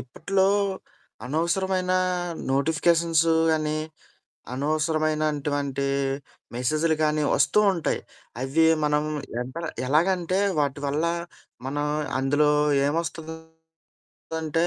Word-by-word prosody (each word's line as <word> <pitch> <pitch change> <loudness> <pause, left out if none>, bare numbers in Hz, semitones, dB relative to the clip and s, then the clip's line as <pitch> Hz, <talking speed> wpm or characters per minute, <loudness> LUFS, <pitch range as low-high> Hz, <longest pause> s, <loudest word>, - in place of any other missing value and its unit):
ఇప్పట్లో, 190 +9 0 0.8
అనవసరమైనా 185 +5 0 0.6
నోటిఫికేషన్స్ 165 +3 +2 0.3
అనీ, 155 0 -1 0.8
అనవసరమైనటువంటి 150 -2 0 0.7
మెసేజులు 155 +6 +1
గానీ, 150 0 +1
ఒస్తూ 210 - +3
ఉంటాయి. 170 -4 -1 0.4
అవి 160 +5 +3 0.2
మనం 150 0 +2 0.4
ఎంతలా 160 +7 -5 0.2
ఎలాగంటే, 175 +5 +2 0.2
వాటి 140 -1 -1
వల్ల 145 +3 0 0.6
మనం 145 +2 -2 0.3
అందులో 145 +3 +2 0.4
ఏమొస్తందంటే, 160 0 -5
155 Hz, 75 wpm, -25 LUFS, 145-165 Hz, 0.8 s, ఒస్తూ